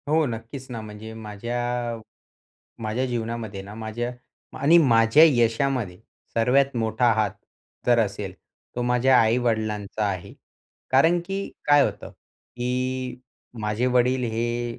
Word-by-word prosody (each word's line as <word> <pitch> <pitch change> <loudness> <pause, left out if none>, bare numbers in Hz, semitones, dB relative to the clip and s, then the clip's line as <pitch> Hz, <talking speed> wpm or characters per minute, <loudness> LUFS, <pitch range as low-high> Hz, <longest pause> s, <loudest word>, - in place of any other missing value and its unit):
हो 155 +1 +3
नक्कीच 115 +2 -6
ना, 115 - -4
म्हणजे 110 +1 -9
माझ्या 120 +2 -3 0.9
माझ्या 110 +4 -1
जीवनामध्ये 115 -4 -4
ना 100 +2 -10
माझ्या 115 +2 -4 0.5
आणि 155 +6 +6
माझ्या 115 -1 +5
यशामध्ये 120 - +1 0.4
सर्वात 130 +3 +2
मोठा 115 +1 +2
हात 110 -3 +1 0.6
जर 120 -1 +5
असेल 100 -3 -1 0.4
तो 120 - -1
माझ्या 125 +1 +4
आई-वडिलांचा 110 -3 0
आहे. - - -4 0.6
कारण 160 +7 +4
की 195 +1 -3 0.3
काय 145 -1 +6
होतं - - -4
की 125 +1 -5 0.4
माझे 105 +3 0
वडील 125 +1 +2
हे 120 +1 -2
120 Hz, 120 wpm, -24 LUFS, 110-125 Hz, 0.9 s, आणि